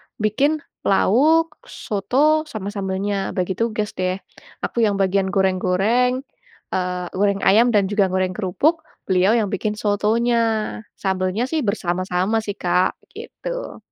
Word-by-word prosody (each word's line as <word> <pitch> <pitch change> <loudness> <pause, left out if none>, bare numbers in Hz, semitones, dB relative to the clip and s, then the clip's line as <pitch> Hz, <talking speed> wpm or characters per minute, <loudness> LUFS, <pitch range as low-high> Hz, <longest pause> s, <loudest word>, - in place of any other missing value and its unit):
bikin 280 +9 +1 0.2
lauk, 305 +11 +3
soto, 295 +10 +1
sama 205 -6 -5
sambelnya. 195 0 -2
Bagi 185 0 -1
tugas 215 -2 -1
deh. 185 0 0 0.5
Aku 235 - -2
yang 205 -3 +3
bagian 195 0 +1
goreng-goreng, 195 +7 +1 0.5
eee, 180 -1 -1
goreng 200 +1 +1
ayam 225 +5 +5
dan 200 -2 +4
juga 200 -2 +3
goreng 185 0 0
kerupuk, 275 - 0 0.2
beliau 190 +4 +3
yang 210 -3 0
bikin 210 +2 -1
sotonya. 220 +1 +1 0.2
Sambelnya 190 +4 -1
sih 315 -2 +1
bersama-sama 185 +1 0
sih 205 -2 -5
Kak, 180 +1 +1
begitu. - - -7
205 Hz, 125 wpm, -21 LUFS, 190-235 Hz, 0.5 s, ayam